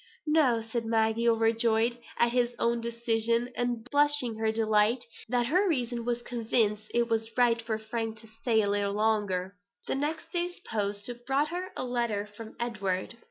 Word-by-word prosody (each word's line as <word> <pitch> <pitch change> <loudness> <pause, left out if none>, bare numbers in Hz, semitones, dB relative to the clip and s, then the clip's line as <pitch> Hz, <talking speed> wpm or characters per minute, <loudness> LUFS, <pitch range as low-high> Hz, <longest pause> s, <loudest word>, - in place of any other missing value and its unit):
"No" 285 -7 +3
said 230 +1 -3
Maggie, 225 +1 +2
overjoyed 225 +1 +2 0.2
at 235 0 +3
her 245 0 +3
own 235 0 +1
decision, 235 +1 0
and 245 -1 -2
blushing 290 -5 +3
her 220 0 +2
delight 220 +2 +2 0.2
that 245 0 +2
her 365 +10 +2
reason 240 -6 0
was 240 0 -1
convinced 220 -3 0
it 235 0 +2
was 225 -1 0
right 235 -2 +4
for 225 -1 -2
Frank 220 0 -4
to 225 - -15
stay 220 0 +1
a - - 0
little 200 0 0
longer. 205 -3 0 0.3
The - - -1
next 295 +4 -3
day's 350 0 -2
post 205 -2 -2 0.2
brought 280 +3 +2
her 360 +2 -4
a - - -1
letter 235 -4 -1
from 215 +2 -11
Edward. 210 -2 -2
230 Hz, 165 wpm, -29 LUFS, 220-245 Hz, 0.3 s, right